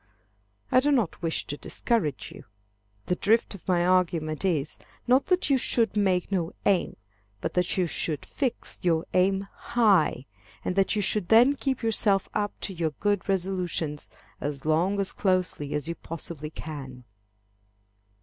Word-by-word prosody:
I - - +6
do 290 +3 +2
not 235 - +1
wish 165 -2 -1
to 145 - -5
discourage 180 - -1
you. - - -12 0.6
The 180 - 0
drift 220 +5 +2
of 200 - -12
my 175 -2 +2
argument 170 -4 +1
is, 165 -7 -1 0.3
not 255 +3 +3
that 365 -5 +2
you 270 - +4
should 230 -3 +1
make 190 -3 +1
no 180 -2 -1
aim, 195 -3 +2 0.4
but - - -3
that 180 +1 0
you 185 - +3
should 155 -2 -3
fix 265 -4 -3
your 165 -3 +1
aim 195 +1 +2
high, 195 - +2 0.4
and 180 - -1
that 195 +2 +2
you 205 - +1
should 205 -2 0
then 240 +5 +7
keep 265 -3 -2
yourself 210 -3 +2
up 205 -1 -2
to 195 - -3
your 160 -4 -2
good 205 -2 0
resolutions, 180 -5 -1 0.3
as 145 -1 -4
long 165 +5 +2
and 200 - 0
as 195 - +1
closely 180 -7 0
as 150 0 -2
you 170 - -2
possibly 160 -2 -7
can. 135 -5 -8
185 Hz, 160 wpm, -27 LUFS, 160-205 Hz, 0.6 s, then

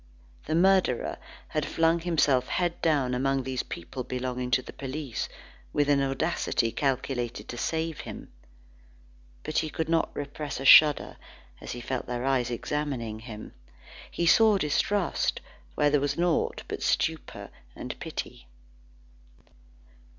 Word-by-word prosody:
The 155 - 0
murderer 185 -7 +2 0.3
had 155 - -1
flung 165 +3 +2
himself 150 -7 +2
head 175 -2 -1
down 140 -6 +2
among 135 +1 +1
these 130 0 -2
people 125 +9 -6
belonging 125 0 -3
to 130 +1 +2
the - - -10
police, 135 -2 -4 0.4
with 145 -1 +2
an 140 -1 +4
audacity 135 -4 0
calculated 130 -3 -2
to - - -5
save 160 -1 -2
him. - - -8 1.1
But 155 - 0
he 155 - -2
could 160 +2 -3
not 165 -1 +2
repress 145 0 -5
a 135 - -5
shudder 150 +1 +7 0.4
as - - -6
he 120 - -6
felt 130 +1 -3
their 125 +1 -3
eyes 130 -3 +1
examining 120 -3 -3
him. 110 -2 -9 0.6
He 170 - -2
saw 215 +4 +6
distrust 185 +4 0 0.4
where 145 - +3
there 145 -1 +3
was 140 0 -1
naught 175 -1 +1
but - - -5
stupor - - -1 0.2
and - - -6
pity. - - -6
140 Hz, 135 wpm, -28 LUFS, 125-160 Hz, 1.1 s, shudder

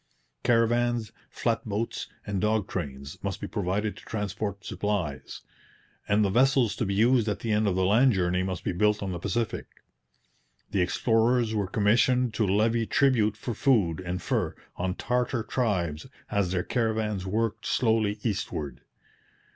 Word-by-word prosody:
Caravans, 120 -1 +2 0.2
flat - - -1
boats, 110 +2 -3 0.2
and 100 -2 -2
dog 105 -2 +1
trains 70 -5 -5
must 100 -2 -3
be - - -5
provided 105 +1 -2
to - - -13
transport 105 -1 -4
supplies; 90 -10 -3 0.7
and 105 +1 +3
the 95 - 0
vessels 130 -1 +3
to 115 - -1
be 100 - -1
used 115 +1 +3
at 105 - -3
the 115 - -2
end 105 0 +2
of 95 - +1
the 95 0 +2
land 120 +6 +5
journey 90 -1 +1
must 95 -1 -3
be - - -1
built 105 +3 +1
on 95 - -3
the 90 - -4
Pacific. 110 +5 -2 1.0
The 95 - +1
explorers 115 +5 +2
were 105 -3 0
commissioned 115 +4 +2
to 110 -2 +1
levy 110 +3 +2
tribute 120 -7 +3
for 120 - -4
food 100 - +2
and 90 0 -3
fur - - -1 0.2
on 90 +1 -2
Tartar 125 -1 -1
tribes 90 - -1 0.2
as 100 -3 +1
their 90 -1 0
caravans 110 -5 -1
worked 110 +2 -1
slowly 110 -3 +2
eastward. 75 - -3
105 Hz, 155 wpm, -27 LUFS, 95-115 Hz, 1.0 s, land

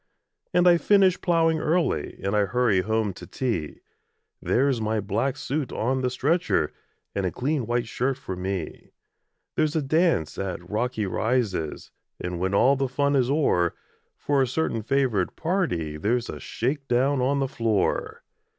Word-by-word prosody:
And 180 0 +4
I 175 -1 +7
finish 195 -2 +4
ploughing 165 -2 +2
early, 165 +2 0
And 100 +2 0
I 105 -1 +3
hurry 105 -2 +2
home 110 0 0
to - - -11
tea 115 - -3 0.6
There's 130 -2 +1
my 110 0 0
black 105 +7 -1
suit 145 -1 -3
on 130 +4 0
the 125 - +1
stretcher, 135 - +1 0.4
And 100 - -1
a - - -2
clean 130 - -1
white 120 0 0
shirt 130 +3 -1
for 95 -8 -6
me; 90 -2 -5 0.6
There's 155 0 +1
a 160 - +2
dance 155 - +1
at 95 -2 -4
Rocky 110 +1 -1
Rises, 105 -5 -1 0.3
And, 90 -1 -4
when 95 +2 0
all 135 +7 +5
the 135 0 0
fun 140 +2 +1
is 130 -2 +2
o'er, 135 - +2 0.4
For 145 -2 +1
a 130 - +2
certain 125 -3 -1
favoured 120 -6 0
party 150 - -1
There's 115 +8 0
a - - -8
shake 135 +4 -3
down 130 +2 +2
on 135 +3 +2
the 135 - +1
floor. 115 -5 -1
125 Hz, 160 wpm, -25 LUFS, 100-140 Hz, 0.6 s, I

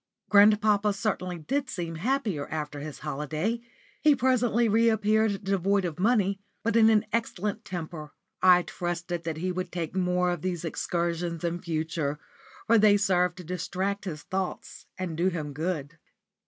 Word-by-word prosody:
Grandpapa 210 0 +5
certainly 190 -4 -2
did 265 - -2
seem 165 -5 -4
happier 215 - -1
after 150 -2 -4
his 150 0 -7
holiday. 155 - -2 0.4
He 300 -2 +5
presently 245 -2 +2
re 225 +2 +4
appeared 215 -1 +1
devoid 195 0 +1
of 165 -1 -4
money, 200 -2 +2 0.2
but 230 0 0
in 225 -1 +6
an 220 0 +3
excellent 215 -2 -2
temper. 160 -5 -6 0.3
I 180 -1 +6
trusted 175 -1 -4
that 160 -2 -3
he 185 +3 -1
would 180 0 -4
take 170 -1 -4
more 180 -1 +1
of 175 - -3
these 175 -2 -3
excursions 170 +1 -2
in 170 0 -2
future, 160 -3 -2 0.5
for 230 0 +5
they 205 -1 +6
served 180 -3 +2
to 180 - -8
distract 185 +4 -3
his 155 -5 -5
thoughts 190 -1 -4
and 180 -3 -3
do 170 +3 +1
him 155 -5 -3
good. 160 0 -3
180 Hz, 155 wpm, -27 LUFS, 165-210 Hz, 0.5 s, in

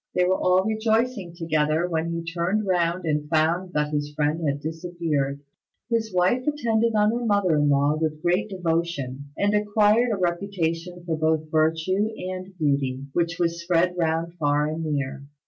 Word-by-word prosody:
They 180 - +3
were 185 +1 +1
all 185 +1 +3
rejoicing 220 -3 0
together, 155 0 +1
when 165 -1 -1
he 170 0 -3
turned 175 +5 -1
round 175 -1 0
and 150 -1 -1
found 170 +4 +1
that 150 0 0
his 145 0 -1
friend 150 +2 0
had 140 0 0
disappeared. 160 -3 -2 0.5
His 225 -2 0
wife 185 +9 +1
attended 230 -6 +1
on 210 0 +4
her 240 +1 -2
mother 200 -6 +2
in 145 0 +3
law 145 +2 +2
with 155 -1 -1
great 180 +5 +1
devotion, 165 -7 -2
and 205 +1 +1
acquired 210 +3 +3
a 210 - 0
reputation 175 -1 -2
both 160 -2 -1
for 160 0 +3 0.3
virtue 185 +6 0 0.3
and 185 +1 -7
beauty, 140 -4 0
which 170 -1 0
was 170 -1 0
spread 175 +1 +1
round 165 0 -1
far 145 -1 +2
and 155 +2 -3
near. 140 -3 -2
170 Hz, 165 wpm, -24 LUFS, 155-190 Hz, 0.5 s, on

